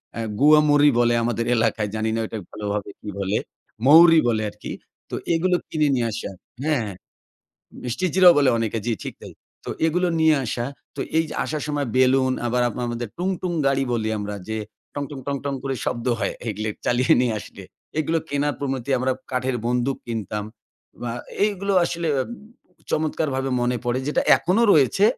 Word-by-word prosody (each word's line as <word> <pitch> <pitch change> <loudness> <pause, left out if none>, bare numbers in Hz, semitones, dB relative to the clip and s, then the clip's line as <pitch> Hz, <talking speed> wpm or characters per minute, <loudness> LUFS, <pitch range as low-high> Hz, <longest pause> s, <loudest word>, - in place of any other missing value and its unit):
এ্যা 115 -1 -3
গুয়া 150 +1 +7
মরি 145 0 +6
বলে 120 0 +4
আমাদের 115 0 -1
এলাকায়, 110 -2 +1
জানি 110 +1 -1
না - - -1
ওটাকে 105 -5 -6
ভালোভাবে 105 -1 -3
কি 105 - -7
বলে? 100 +2 0 0.5
মৌরি 165 +2 +8
বলে 110 -2 +1
আরকি। - - -9 0.4
তো - - -2 0.2
এগুলো 180 +2 +2
কিনে 155 -2 +1
নিয়ে 120 -2 +1
আসা 105 - -5 0.3
হ্যাঁ, 150 -4 +1
হ্যাঁ। 100 -3 -6 0.9
মিষ্টি 125 +9 -1
জিরাও 185 -2 +8
বলে 140 -2 +4
অনেকে 115 0 -1
জি, 120 - 0
ঠিক - - -6
তাই। - - -10 0.3
তো - - -4 0.2
এগুলো 180 +2 +1
নিয়ে 160 -1 +5
আসা। 120 +1 -2 0.3
তো - - -4 0.2
এই 160 - +3 0.2
আসার 155 -1 -3
সময় 145 -2 -1
বেলুন 130 0 +4
আবার 125 +1 +1
আপনা 125 +2 -5
আমাদের 120 -1 -4
টুং, 180 +2 -1
টুং 180 -1 -2
গাড়ি 135 0 +2
বলি 110 -2 0
আমরা 105 0 -4
যে, 110 0 -2 0.4
টং, 145 - -2
টং, 140 - -7
টং, 140 0 -1
টং 140 -1 -1
করে 135 -1 -2
শব্দ 120 +1 -3
হয়, 100 - -1 0.2
এগুলি 110 +1 -2 0.2
চালিয়ে 125 +1 +4
নিয়ে 120 -3 +1
আসলে। - - -11 0.4
এগুলো 160 +2 +1
কেনার 145 0 0
প্রণতি, 135 -1 -3
আমরা 130 +1 +1 0.2
কাঠের 125 0 0
বন্দুক 125 +2 0
কিনতাম। 105 -2 -3 0.6
ব্য - - -6
আ - - -4 0.3
এগুলো 200 -1 -2
আসলে 170 -1 -2 0.8
চমৎকারভাবে 140 -4 -1
মনে 120 0 +1
পড়ে, 120 +1 0
যেটা - - +1
এখনো 190 +7 +1
রয়েছে। 150 +7 +4
130 Hz, 180 wpm, -23 LUFS, 115-150 Hz, 0.9 s, মৌরি